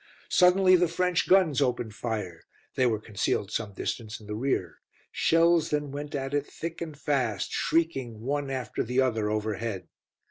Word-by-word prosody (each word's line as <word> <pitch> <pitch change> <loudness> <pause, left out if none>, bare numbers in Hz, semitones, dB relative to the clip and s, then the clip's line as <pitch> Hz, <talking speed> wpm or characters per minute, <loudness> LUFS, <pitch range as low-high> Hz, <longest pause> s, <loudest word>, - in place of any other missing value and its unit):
Suddenly 185 +1 +5
the 175 0 +3
French 180 +1 0
guns 175 -7 +4
opened 120 -4 0
fire; 105 -8 -4 0.3
they 130 - +2
were 110 -2 +1
concealed 105 -1 -2
some 105 -3 -3
distance 110 +2 -4
in 110 - -14
the 105 - -5
rear. 105 - -2 0.3
Shells 165 0 +3
then 145 -2 -1
went 145 +1 -5
at 135 0 -3
it 145 0 0
thick 165 +1 -6
and 160 -3 -6
fast, 125 -10 -1
shrieking 135 -9 0
one 140 +4 -2
after 130 -4 -3
the 125 +3 -1
other 110 -5 +1
overhead. 110 -1 -3
130 Hz, 165 wpm, -27 LUFS, 110-160 Hz, 0.3 s, Suddenly